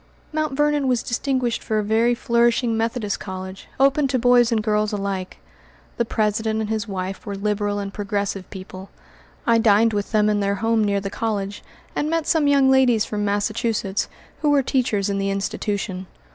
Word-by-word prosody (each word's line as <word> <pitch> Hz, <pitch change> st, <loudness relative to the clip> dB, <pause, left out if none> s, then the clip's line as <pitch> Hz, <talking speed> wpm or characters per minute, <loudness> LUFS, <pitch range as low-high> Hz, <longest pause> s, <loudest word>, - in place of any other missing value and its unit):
Mt. 310 Hz, -2 st, -1 dB
Vernon 295 Hz, 0 st, +1 dB
was 245 Hz, -2 st, +1 dB
distinguished 250 Hz, -1 st, -1 dB
for 220 Hz, -, -1 dB
a 215 Hz, -, +1 dB
very 225 Hz, +3 st, +2 dB
flourishing 235 Hz, 0 st, +2 dB
Methodist 225 Hz, -2 st, -1 dB
college, 190 Hz, 0 st, -7 dB
open 275 Hz, +1 st, +4 dB
to 260 Hz, 0 st, 0 dB
boys 245 Hz, -1 st, +4 dB
and 220 Hz, -2 st, +1 dB
girls 210 Hz, -1 st, +1 dB
alike. 195 Hz, -2 st, -3 dB, 0.6 s
The 235 Hz, -, +1 dB
president 220 Hz, 0 st, 0 dB
and 220 Hz, 0 st, -2 dB
his 220 Hz, 0 st, -2 dB
wife 190 Hz, -1 st, -4 dB
were 200 Hz, -, -5 dB
liberal 205 Hz, 0 st, -1 dB
and 200 Hz, -1 st, -4 dB
progressive 200 Hz, -2 st, -3 dB
people. 190 Hz, 0 st, -9 dB, 0.6 s
I 230 Hz, -1 st, +4 dB
dined 220 Hz, 0 st, +4 dB
with 205 Hz, -1 st, -2 dB
them 210 Hz, -1 st, +3 dB
in 210 Hz, -1 st, +2 dB
their 200 Hz, 0 st, 0 dB
home 225 Hz, +2 st, +1 dB
near 200 Hz, -1 st, +1 dB
the 195 Hz, 0 st, -5 dB
college, 205 Hz, -3 st, -3 dB, 0.3 s
and 300 Hz, -, 0 dB
met 330 Hz, -1 st, 0 dB
some 315 Hz, -3 st, +2 dB
young 275 Hz, -2 st, +4 dB
ladies 250 Hz, -5 st, +4 dB
from 210 Hz, -1 st, -3 dB
Massachusetts, 205 Hz, 0 st, -1 dB, 0.3 s
who 300 Hz, -, +2 dB
were 285 Hz, -2 st, +4 dB
teachers 240 Hz, -7 st, 0 dB
in 200 Hz, -1 st, -1 dB
the 195 Hz, 0 st, 0 dB
institution. 195 Hz, -1 st, -3 dB
215 Hz, 180 wpm, -22 LUFS, 200-240 Hz, 0.6 s, open